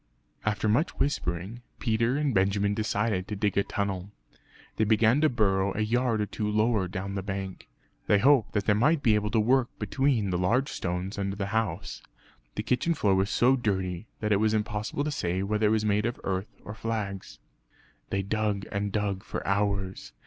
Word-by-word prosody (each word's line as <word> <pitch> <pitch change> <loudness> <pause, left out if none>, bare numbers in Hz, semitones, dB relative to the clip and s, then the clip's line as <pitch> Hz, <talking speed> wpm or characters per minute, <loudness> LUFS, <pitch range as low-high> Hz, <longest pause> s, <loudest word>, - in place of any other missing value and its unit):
After 110 +1 0
much 120 +11 +1
whispering, 100 - -2 0.2
Peter 115 +2 +1
and 145 -3 0
Benjamin 100 +1 +2
decided 105 -2 -1
to 105 - -4
dig 105 -1 0
a 100 - +3
tunnel. 100 -2 -3 0.7
They - - +3
began 110 +5 +4
to 155 - +5
burrow 100 -5 +1
a - - 0
yard 115 0 +1
or - - +1
two 105 +1 -3
lower 105 -2 +2
down 95 +2 -5
the 100 - -2
bank. 95 -1 -5 0.4
They 105 - +5
hoped 130 +2 +4
that 105 -1 0
they 105 - +4
might 145 +8 +2
be 110 - +5
able 105 0 +1
to 110 - +2
work 125 +3 +3
between 130 -8 0
the 90 - 0
large 125 +10 +2
stones 90 +3 -3
under 100 0 -2
the 100 -1 -2
house; 105 -4 -2 0.5
the - - -2
kitchen 125 +8 +1
floor 100 -9 +2
was 95 +1 +2
so 125 +3 +4
dirty 95 -5 -2
that 105 -1 -1
it 100 - +4
was 110 0 +2
impossible 105 +5 -2
to 150 - -2
say 90 -7 -1
whether 105 +2 +1
it - - +3
was 110 0 +1
made 105 +1 +2
of 120 - -4
earth 95 +1 -3
or 105 - -6
flags. 105 -4 -4 0.7
They 100 0 -1
dug 105 -1 -1
and 100 0 -2
dug 100 -2 -1
for - - -6
hours. 100 -5 -1
105 Hz, 190 wpm, -28 LUFS, 100-115 Hz, 0.7 s, to